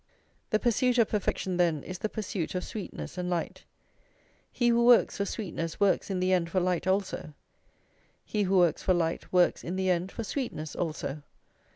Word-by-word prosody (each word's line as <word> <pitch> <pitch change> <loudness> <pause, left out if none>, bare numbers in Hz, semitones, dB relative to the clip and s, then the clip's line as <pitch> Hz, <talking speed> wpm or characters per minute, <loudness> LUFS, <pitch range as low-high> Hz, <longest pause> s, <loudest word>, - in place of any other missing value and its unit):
The 215 - +3
pursuit 245 +2 +2
of 230 -3 +4
perfection, 190 -3 -1
then, 165 -5 +2
is 185 -1 -7
the 215 - -2
pursuit 195 -6 -4
of 180 - -1
sweetness 200 -3 -6
and 180 0 -2
light. 175 -2 -3 0.9
He 240 -1 +2
who 235 0 +4
works 240 -1 +5
for 200 - 0
sweetness 170 -6 -4
works 200 0 +2
in 190 -2 -1
the 185 +1 +2
end 170 -2 +1
for 185 - +1
light 180 0 0
also; 190 -5 -1 0.9
he 210 - -1
who 195 -1 +2
works 175 -4 +3
for 185 - +2
light 165 -1 -1
works 180 -1 +3
in 175 - -4
the 190 0 +1
end 180 +2 -1
for 230 - -5
sweetness 205 - -4
also. 155 -3 -3
185 Hz, 185 wpm, -29 LUFS, 175-210 Hz, 0.9 s, works